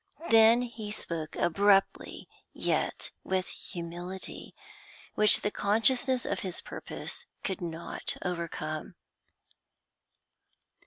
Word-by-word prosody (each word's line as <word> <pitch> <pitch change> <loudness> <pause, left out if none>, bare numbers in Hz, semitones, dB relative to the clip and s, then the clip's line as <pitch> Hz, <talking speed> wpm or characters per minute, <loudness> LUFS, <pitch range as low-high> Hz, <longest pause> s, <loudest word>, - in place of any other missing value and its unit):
Then 225 +2 +7
he 230 -3 -6
spoke 165 -6 -4
abruptly, 195 +3 +2 0.3
yet - - -1
with 185 -1 0
humility, 175 +2 -7 0.6
which 215 -1 +6
the 205 - 0
consciousness 245 +6 +2
of - - -1
his 185 -3 -4
purpose - - -7 0.2
could 190 -2 -3
not 170 -1 -3
overcome. 165 -3 -4
190 Hz, 90 wpm, -30 LUFS, 170-220 Hz, 0.6 s, Then